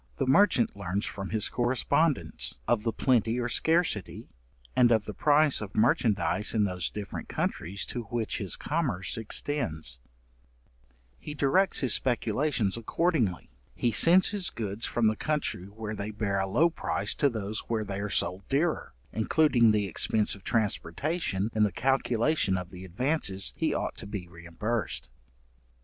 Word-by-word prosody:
The 135 - 0
merchant 135 - +3
learns 100 +1 -3
from 95 -1 -5
his 110 -2 +1
correspondents, 135 +5 +1
of 120 -3 +2
the 115 +1 -1
plenty 120 -1 +1
or 120 - -1
scarcity, 160 - 0 0.5
and 120 -1 +5
of 110 -2 +2
the 105 - -6
price 150 0 +3
of 105 -2 -7
merchandize 110 -1 +2
in 105 - +3
those 90 -3 -1
different 105 -1 -7
countries 95 +6 -3
to 120 -2 -5
which 115 +1 -3
his 100 -4 -1
commerce 135 - -2
extends; 80 - -1 1.2
he 150 - -7
directs 180 +8 +2
his 130 - +4
speculations 120 -3 0
accordingly, 115 - -1 0.2
he 120 - +1
sends 175 - +6
his 200 -4 +1
goods 105 0 -4
from 120 - 0
the 110 0 +3
country 150 -10 -2
where 105 +2 -7
they 105 0 -4
bear 100 -2 -2
a 95 - -1
low 165 - +3
price - - -2
to 140 - +2
those 110 -3 -3
where 110 -2 -1
they 100 0 -4
are 105 +1 -3
sold 90 -1 0
dearer, 155 - -1 0.2
including 120 0 +3
the 105 -1 +2
expence 105 +3 +1
of 100 - -11
transportation 110 - -1
in 110 - 0
the 105 -2 +3
calculation 125 - +1
of 90 -1 -6
the 90 0 -10
advances 100 - -1
he - - 0
ought - - -3
to - - -8
be 100 -4 -6
reimbursed. 85 - -4
110 Hz, 155 wpm, -28 LUFS, 100-135 Hz, 1.2 s, sends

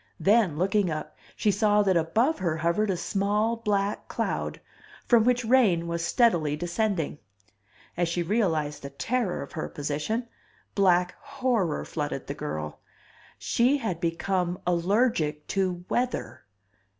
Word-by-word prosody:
Then, 200 -7 +3
looking 195 +2 +2
up, 155 -1 -5 0.2
she 210 - +2
saw 210 +1 +3
that 190 -2 +2
above 220 - +2
her 170 -4 -1
hovered 170 +6 +1
a 185 - 0
small 210 +5 0
black 205 -2 -1
cloud, - - -2 0.5
from 235 -3 +5
which 245 -1 +2
rain 220 -9 +4
was 170 0 -2
steadily 170 - +2
descending. 175 -1 -1 0.8
As 175 -1 0
she 175 +1 -1
realized 165 -7 0
the 140 - -6
terror 205 - -1
of 140 - -11
her 155 -1 -4
position, 150 - -3 0.5
black 180 -2 +3
horror 245 - -1
flooded 145 -3 -4
the 140 - -4
girl. 75 - -5 0.6
SHE 250 +5 +2
HAD 185 -10 -3
BECOME 175 +1 -1
ALLERGIC 175 -4 +1
TO 180 -2 -1
WEATHER! 185 - -2
185 Hz, 135 wpm, -27 LUFS, 165-220 Hz, 0.8 s, from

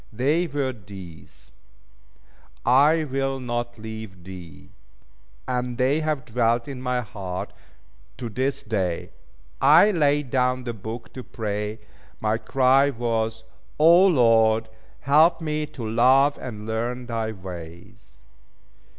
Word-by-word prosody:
They 145 +10 +1
were 140 -3 -2
these: 95 - -13 1.1
"I 145 +6 +5
will 135 -1 -2
not 120 -1 -4
leave 110 -4 -9
thee." 90 -4 -11 0.8
And 125 -1 -2
they 135 +4 +2
have 155 -4 -2
dwelt 115 0 0
in 135 -3 -7
my 125 -1 -1
heart 95 -5 -6 0.6
to 120 - -5
this 135 +5 -2
day. 95 -8 -2 0.5
I 155 +9 +7
laid 145 -6 +1
down 125 -1 +1
the 120 -1 -4
book, 110 +3 -8
to 130 - -7
pray. 105 -3 -4 0.4
My 110 +1 0
cry 135 +2 +3
was 115 -3 -2 0.4
"O, 170 +5 +7
Lord, 115 - +3 0.3
help 155 +6 +4
me 155 -2 -2
to 120 -6 -7
love 130 +5 +4
and 105 -4 -7
learn 120 +3 -3
thy 115 -2 -3
ways." 90 -2 -11
120 Hz, 120 wpm, -24 LUFS, 110-135 Hz, 1.1 s, I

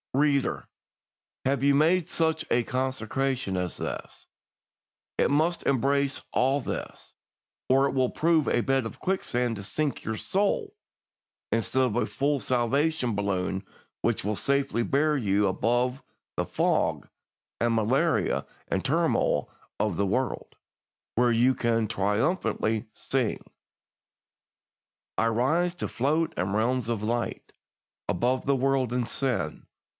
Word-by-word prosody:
"Reader, 140 -1 +1 0.8
have 135 0 +1
you 140 0 +5
made 160 +4 +3
such 160 -1 +1
a 120 - +3
consecration 130 -3 -1
as 90 -1 -2
this? - - -6 0.9
It - - +3
must 160 +4 +1
embrace 140 +1 +1
all 135 +3 +3
this, - - -6 0.6
or 135 +2 +5
it - - -3
will 130 -2 +2
prove 160 -2 +2
a - - +2
bed 135 0 +1
of 115 - -7
quicksand 125 -11 -1
to 100 - -7
sink 145 +9 -2
your 110 0 -3
soul, 395 - 0 0.8
instead 120 +3 +1
of 120 -4 0
a 120 - +2
full 140 +1 0
salvation 130 +1 +1
balloon, 95 -1 -1 0.4
which - - 0
will 105 +1 0
safely 140 -1 0
bear 150 +5 +2
you 105 -5 +2
above 120 +6 0 0.3
the - - -1
fog - - 0 0.5
and 120 0 +2
malaria 135 +9 +1 0.2
and - - -1
turmoil - - +1 0.3
of 105 -3 0
the 100 - +2
world, 125 +6 -2 0.6
where 120 +1 +3
you 125 +3 +3
can 115 -2 +1
triumphantly 110 - 0
sing: 125 +1 -1 1.8
"'I 115 - +3
rise 155 +10 +1
to - - -3
float 155 +6 0
in 90 +2 -1
realms 120 +2 +1
of 110 -3 -1
light, 120 +2 -2 0.6
Above 120 +9 +1
the 140 - +3
world 135 -2 +1
and 125 -1 0
sin. 120 - -2
130 Hz, 130 wpm, -27 LUFS, 115-140 Hz, 1.8 s, you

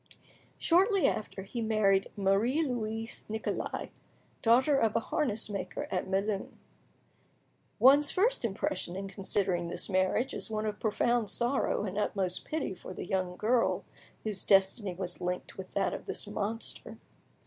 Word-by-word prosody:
Shortly 385 +3 +3
after, 200 -2 -3
he 230 +5 -5
married 210 -3 +2
Marie 205 +10 +2
Louise 225 -4 -3
Nicolais; 220 +1 -3 0.5
daughter 255 +6 +4
of 225 -5 +2
a - - +4
harness 225 -2 0
maker 195 -3 -4
at 185 0 -1
Melun. 195 +1 -1 1.2
One's 280 +3 +6
first 445 - +2
impression 230 - -2
in 195 +1 -4
considering 190 -3 -1
this 170 - -3
marriage 185 +7 +1
is - - -1
one 215 0 -2
of 210 -1 -3
profound 235 0 +1
sorrow 245 -2 +1
and 195 +1 -3
utmost 190 -3 -1
pity 305 -10 -2
for 185 0 -9
the - - -5
young 180 -1 -1
girl 230 +2 +1 0.4
whose 210 -3 -3
destiny 195 0 +3
was 180 -1 -4
linked 180 0 -3
with 190 -1 -8
that 200 - +1
of - - -7
this - - -2
monster. 210 +2 -4
210 Hz, 145 wpm, -31 LUFS, 195-240 Hz, 1.2 s, One's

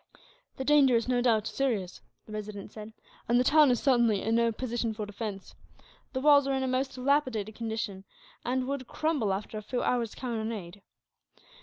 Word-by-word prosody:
"The 265 - -4
danger 280 -4 +5
is, 230 +1 +1
no 250 -1 +2
doubt, 225 -4 +2
serious," 220 -9 -2 0.2
the - - -13
Resident 210 -1 -6
said; 215 0 -9 0.4
"and 240 +1 +4
the - - +4
town 300 +1 +6
is 245 -2 +2
certainly 235 -7 +3
in 225 - 0
no 230 0 +3
position 230 -1 -3
for 210 -1 -4
defence. 205 -1 -6 0.6
The 260 - -2
walls 285 -1 +6
are 270 - +1
in 265 - -1
a - - 0
most 260 +1 -1
dilapidated 255 -5 0
condition, 220 -3 -4 0.4
and 255 +1 -1
would 275 -2 -3
crumble 300 -10 0
after 205 +2 -4
a - - -9
few 245 +4 -3
hours' 235 -3 0
cannonade. 220 -6 -5
235 Hz, 180 wpm, -29 LUFS, 215-260 Hz, 0.6 s, town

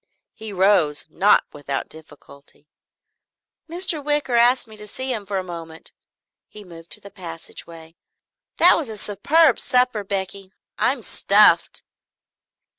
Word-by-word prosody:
He 220 -1 -10
rose, 185 -6 +1
not 205 +2 +3
without 140 -2 -5
difficulty. 145 -2 -15 1.0
"Mr. 340 -3 -1
Wicker 295 -3 -1
asked 240 +1 +3
me 220 - -14
to 210 0 -9
see 260 +4 -3
him 210 -4 -6
for 200 - -3
a 190 - -3
moment." 165 -2 -8 0.6
He 210 - -13
moved 170 -3 -15
to - - 0
the 200 - -14
passageway. 165 -2 -10 0.6
"That 350 - +6
was 305 -8 -4
a 220 - -6
superb 280 - +2
supper, 250 -4 +2
Becky. 190 -1 -5 0.3
I'm - - 0
stuffed." - - +4
200 Hz, 130 wpm, -21 LUFS, 165-250 Hz, 1.0 s, That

